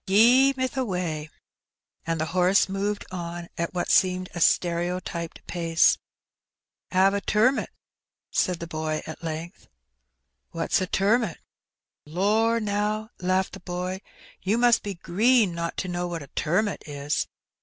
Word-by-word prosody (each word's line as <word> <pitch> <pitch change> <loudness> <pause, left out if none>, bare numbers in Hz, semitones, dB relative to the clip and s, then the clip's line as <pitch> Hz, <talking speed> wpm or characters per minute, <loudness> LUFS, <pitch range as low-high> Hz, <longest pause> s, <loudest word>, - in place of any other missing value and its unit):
" - - -53
Gee, 245 +7 +6
meth 260 +1 -2
a 260 - +2
way," 170 -7 -3 0.8
and 165 -1 0
the 155 - 0
horse 185 +2 +4
moved 200 +2 -2
on 170 -1 -5
at 170 +1 -3
what 175 - 0
seemed 185 0 +3
a 175 - -5
stereotyped 170 -1 0
pace. 165 -2 +2 0.9
"'Ave 195 +2 +4
a - - -3
turmut? 235 +8 +2 0.6
said 180 -2 +1
the 170 - -5
boy 155 -1 -3
at 160 - -8
length. 165 +3 -6 0.4
" - - -53
What's 165 +3 0
a 185 - -1
turmut? 205 0 +1 0.4
" - - -66
"Lor*, 220 +4 +3
now/' 210 +1 -1
laughed 185 +1 0
the - - -8
boy, 180 +2 -4 0.4
"you 205 +4 +1
must 240 -1 +4
be 200 -2 -5
green 210 +4 +3
not 170 0 -4
to 185 - -2
know 175 0 -2
what 170 -3 -5
a 140 - -14
turmut 190 +6 0
is.'' 145 0 -2
185 Hz, 155 wpm, -26 LUFS, 170-210 Hz, 0.9 s, Gee